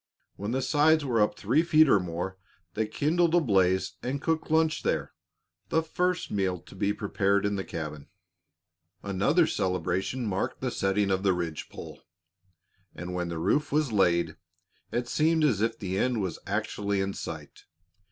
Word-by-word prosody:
When 100 +1 -5
the 130 +2 -1
sides 155 +1 +3
were 120 -5 +2
up 105 0 +1
three 125 +10 +2
feet 155 -2 +5
or 105 - +5
more, 90 +2 -4 0.3
they 110 +1 -1
kindled 165 +8 +1
a - - +6
blaze 95 - +2
and 135 +3 -2
cooked 160 +2 -1
lunch 160 0 +2
there - - -1 0.6
the 160 - +2
first 180 +3 -1
meal 95 -3 0
to - - -16
be 100 +1 0
prepared 100 -1 0
in 100 0 0
the 95 - -2
cabin. 75 -4 -6 1.0
Another 105 - +2
celebration 95 - -1
marked 95 -3 -2
the - - -2
setting 95 +1 +1
of 95 0 +1
the 95 -1 +3
ridge 85 -3 -4
pole; - - -10 0.9
and 90 +2 -6
when 90 -1 -2
the 85 - -4
roof 145 - +1
was 150 -3 +1
laid, 90 -4 +2 0.5
it 120 0 -1
seemed 160 +4 +2
as 120 -10 +2
if 115 0 0
the 95 -1 -3
end 125 -3 +1
was 95 -5 -3
actually 100 -1 -1
in 95 0 -1
sight. - - -8
105 Hz, 170 wpm, -28 LUFS, 95-145 Hz, 1.0 s, a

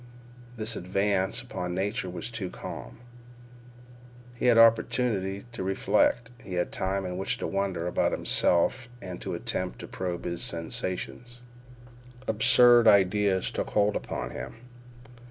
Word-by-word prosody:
This 110 +1 -1
advance 95 +1 0
upon 90 0 -5
Nature 100 +1 -2
was 90 +6 -5
too 105 -6 -4
calm. - - -8 1.4
He 120 - -1
had 120 -2 +5
opportunity 110 -3 +3
to 115 - -6
reflect. 105 +5 +1
He 90 - -6
had 90 - -1
time 95 +1 -2
in 90 0 -4
which 95 - -1
to - - -4
wonder 95 -3 -2
about 90 - +1
himself 120 +9 +1
and 90 -4 -8
to - - -4
attempt - - -3
to - - -9
probe 90 -2 -5
his 85 -1 -3
sensations. 95 +8 -3 0.8
Absurd 120 +1 +6
ideas 100 -1 +3
took - - -3
hold 105 0 +2
upon - - -4
him. - - -7
100 Hz, 135 wpm, -27 LUFS, 90-115 Hz, 1.4 s, Absurd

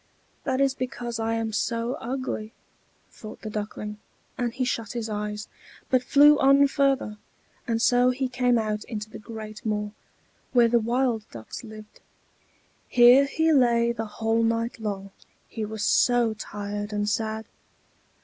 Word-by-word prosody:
"That 260 0 0
is 275 -1 +3
because 245 -3 -5
I 225 0 0
am 225 -1 -2
so 230 +2 -1
ugly!" 245 -3 -4 0.6
thought 215 - -11
the 215 - -5
Duckling; 210 0 -5 0.4
and 245 -2 -1
he 255 +2 -2
shut 230 -4 -3
his 230 -2 -4
eyes, 210 0 -4 0.4
but 255 -1 +4
flew 290 +3 +6
on 275 +1 +6
further; 275 -6 0 0.5
and 230 -1 0
so 245 +2 +4
he 260 +1 -1
came 245 -1 +2
out 215 -1 -1
into 215 -1 -6
the - - -8
great 215 0 -9
moor, 210 -1 -2 0.6
where 240 -2 +5
the 235 0 +4
wild 235 -1 0
ducks 115 - -9
lived. 215 -1 -12 0.9
Here 245 +3 +7
he 320 +3 +1
lay 235 -3 +4
the 225 -1 -4
whole 225 +2 0
night 230 +1 0
long, 200 -2 -4 0.4
he 220 -2 -4
was 215 0 -5
so 240 0 +3
tired 205 0 -5
and 205 0 -1
sad. 220 +1 -2
230 Hz, 150 wpm, -26 LUFS, 215-250 Hz, 0.9 s, Here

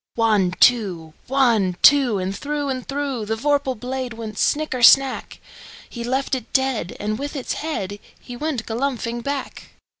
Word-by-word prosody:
One, 210 -6 +2
two! 185 -10 +3
One, 235 -9 +2
two! 270 -7 +6
And 190 +1 -3
through 290 +3 -3
and 255 -1 -4
throughThe 265 -6 -3
vorpal 280 -1 0
blade 255 0 -4
went 220 -2 -7
snicker 295 -4 0
snack! 270 +2 +4 0.5
He 235 - -7
left 265 +3 -2
it 255 -4 -3
dead, 265 -9 0
and 215 +1 -3
with 285 +2 -5
its 270 - -3
headHe 205 -11 -4 0.4
went 295 -7 -2
galumphing 240 0 -2
back. 280 +2 -5
245 Hz, 145 wpm, -21 LUFS, 215-275 Hz, 0.5 s, two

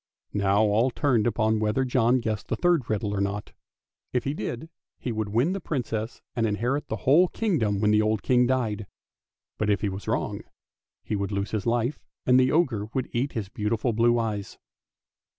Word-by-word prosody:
Now 100 +1 +3
all 110 +4 +3
turned 125 -4 +1
upon 110 -1 +1
whether 110 +5 +1
John 125 0 +2
guessed 110 -3 -3
the - - -1
third 175 -8 +2
riddle 105 -1 -1
or 100 - -1
not. 100 +1 -3 0.6
If 125 - +1
he 140 - -1
did, 140 -1 -4 0.3
he 125 - -4
would 110 -2 -2
win 120 - +2
the 195 - -3
Princess 120 -7 -3
and 115 -2 +1
inherit 125 +8 -1
the - - -2
whole 155 +7 +6
kingdom 140 - 0
when 105 0 +3
the 105 0 +4
old 110 -2 0
King 125 -1 +3
died; 110 -5 -1 0.7
but 105 - +1
if 105 - +2
he 105 - 0
was 95 +1 -7
wrong, - - -1 0.6
he - - -2
would 100 0 -2
lose 100 0 -2
his 110 -2 -2
life, 120 +4 0 0.2
and 125 0 +5
the 130 0 +3
ogre 130 -11 +1
would 130 -1 -2
eat 130 +4 -1
his 110 -4 -3
beautiful 110 +3 -1
blue 120 +2 +3
eyes. 110 -4 -3
115 Hz, 190 wpm, -26 LUFS, 105-130 Hz, 0.7 s, whole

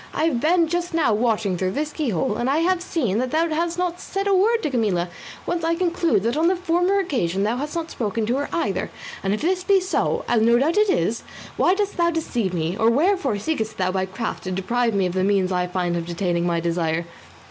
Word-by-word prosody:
I - - 0
have 310 -7 +1
been 330 +4 +3
just 350 +1 -2
now 315 -9 +3
watching 215 -3 +1
through 185 0 -1
this 300 +1 -2
keyhole, 215 - -1
and 240 - -1
I 280 - +2
have 355 +2 +2
seen 245 - -1
that 255 +1 -1
thou 325 +5 +1
has 335 +2 -1
not 360 -1 -1
said 390 +1 -3
a 400 - +2
word 445 +5 +3
to 300 - -1
Camilla, 200 -8 0 0.4
whence 345 -1 -2
I 330 +1 +1
conclude 340 - +1
that 235 +3 0
on 320 +2 +2
the 370 - +3
former 360 +2 +1
occasions 200 - -1
thou 225 +4 0
hast 295 +4 -4
not 335 -1 -3
spoken 220 -1 -2
to 240 +4 0
her 285 - -2
either, 205 - -1 0.3
and 195 - -1
if 210 - -1
this 365 +2 +1
be 390 0 +4
so, 370 +1 -1
as 230 - +2
no 235 +2 +5
doubt 310 +9 +1
it 425 -1 +3
is, 215 - +1 0.3
why 365 - +3
dost 405 0 -2
thou 340 -1 +3
deceive 245 - -1
me, 170 0 -2
or 225 +2 +3
wherefore 290 - +2
seekest 220 -1 -3
thou 185 -1 0
by 190 0 -1
craft 220 +5 -4
to 185 - -3
deprive 230 +5 0
me 195 -1 +2
of 180 - -2
the 185 0 0
means 195 -1 +2
I 180 -1 +1
might 180 - -16
find 175 -2 0
of 170 0 -4
attaining 175 -1 -1
my 170 -1 +1
desire?" 165 -1 -1
245 Hz, 245 wpm, -22 LUFS, -, 0.4 s, no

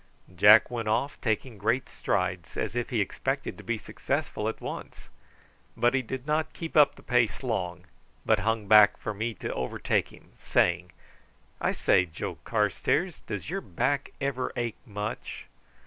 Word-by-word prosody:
Jack 105 +6 +7
went 115 -3 -3
off; 125 +6 0
taking 110 0 -2
great 115 +6 +1
strides 90 -3 -2
as - - -2
if 120 -1 -1
he 115 -4 +1
expected 100 - -2
to - - -12
be 120 -1 -1
successful - - -2
at - - -6
once; - - -8 0.7
but 120 +1 +3
he 130 - +2
did 130 +2 -6
not 155 +1 0
keep 165 -1 -6
up 150 -2 +6
the - - -16
pace 120 -1 +1
long, 90 -7 -2 0.4
but - - +3
hung 110 +1 -1
back 105 0 +7
for 110 - -4
me 110 +2 -3
to - - -4
overtake 65 -1 -1
him, - - -17
saying: 85 +1 +1 0.7
"I - - +2
say, 90 - +3
Joe 80 - -6
Carstairs; 175 -1 0
does 105 - -5
your 195 +1 -2
back 130 - -1
ever 135 -2 -2
ache 120 -2 -3
much?" 105 0 -5
110 Hz, 165 wpm, -28 LUFS, 100-130 Hz, 0.7 s, Jack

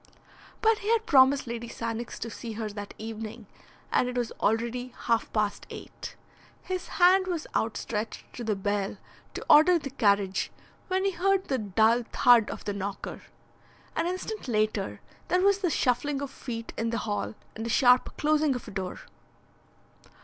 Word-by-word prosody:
But 445 -1 +4
he 410 - -4
had 455 -1 +2
promised 270 -1 +5
Lady 235 0 -5
Sannox 230 0 -4
to 230 - -4
see 230 +1 -6
her 215 0 -3
that 205 0 -7
evening 225 0 -7 0.5
and 250 - +2
it 250 - -4
was 240 -2 -1
already 235 +3 0
half 230 -2 +1
past 210 -2 -1
eight. - - -9 0.5
His 370 -1 -4
hand 370 +1 +6
was 345 -4 -2
outstretched 220 0 -2
to 240 - -6
the 220 -2 0
bell 200 0 -1 0.4
to - - -5
order 330 +4 +7
the 285 -4 -6
carriage 200 -6 +1 0.4
when 380 +1 0
he 395 - +2
heard 385 +1 +1
the 265 -2 +1
dull 220 +3 +3
thud 240 -4 +5
of - - -7
the 205 - -1
knocker. 200 0 -5 0.7
An 330 - 0
instant 370 +1 -4
later 215 -3 0 0.3
there 360 - +2
was 400 0 +4
the 370 -3 +1
shuffling 275 0 +1
of 280 -1 -5
feet 230 -4 -6
in 230 0 0
the 230 - -1
hall, 100 +1 -2 0.2
and 225 - -5
the 230 - -3
sharp 250 +1 +4
closing 300 -2 +2
of 245 - -6
a - - -7
door. 190 -2 -4
235 Hz, 170 wpm, -28 LUFS, 215-305 Hz, 0.7 s, order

